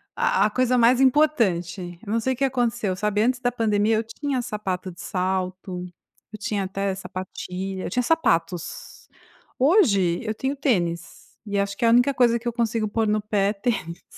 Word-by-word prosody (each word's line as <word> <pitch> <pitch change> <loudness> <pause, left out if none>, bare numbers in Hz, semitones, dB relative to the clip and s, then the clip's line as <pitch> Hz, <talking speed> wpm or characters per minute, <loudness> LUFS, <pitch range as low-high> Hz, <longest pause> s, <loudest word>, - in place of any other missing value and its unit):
a - - +2
a 215 - +2
coisa 255 +2 +2
mais 245 +2 +5
importante. 185 - +1
Eu 200 - -5
não 230 - +2
sei 260 +3 0
o - - -9
que 275 - -1
aconteceu, 240 -7 0
sabe, 210 +1 0
antes 250 +2 +1
da 245 -1 0
pandemia, 220 -2 +1
eu 225 - 0
tinha 255 +4 -3
sapato 195 -5 -4
de 170 - -12
salto, 185 0 -3 0.5
eu 215 - -8
tinha 205 -2 -2
até 195 +1 -2
sapatilha, 185 0 -6
eu - - -3
tinha 250 - 0
sapatos. 180 - -1 0.5
Hoje, 215 - +4
eu 220 -1 -3
tenho 265 +5 -2
tênis, 180 - -2
e 205 -1 -2
acho 200 0 -1
que - - 0
a - - +5
única 245 +4 +4
coisa 240 -2 +3
que 240 - -7
eu 240 - -1
consigo 230 -2 0
pôr 220 +1 0
no 210 0 +1
pé, 205 -1 +1
é - - -1
tênis. 200 -6 -3
215 Hz, 190 wpm, -24 LUFS, 190-245 Hz, 0.5 s, mais